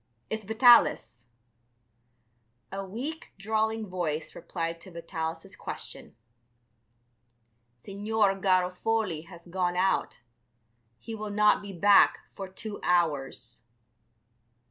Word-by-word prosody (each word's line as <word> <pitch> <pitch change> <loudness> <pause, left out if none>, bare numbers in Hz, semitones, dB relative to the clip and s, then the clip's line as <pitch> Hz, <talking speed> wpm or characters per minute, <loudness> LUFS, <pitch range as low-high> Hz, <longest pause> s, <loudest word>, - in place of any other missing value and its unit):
It's 220 0 -3
Vitalis." 220 - +4 1.4
A 195 +1 -4
weak, 250 +12 -6
drawling 220 +2 -1
voice 170 -5 -3
replied 165 -1 -4
to 190 - -11
Vitalis' 165 -1 -5
question. - - -8 1.7
"Signor 205 - +1
Garofoli 185 -1 0
has 170 -3 -13
gone 180 0 -1
out; 190 -8 0 0.8
he 225 - -8
will 215 -1 -5
not 210 +1 +4
be 200 -1 -8
back 200 +2 +5 0.2
for 195 -1 -6
two 205 +2 -7
hours." 145 -9 0
190 Hz, 95 wpm, -28 LUFS, 170-215 Hz, 1.7 s, back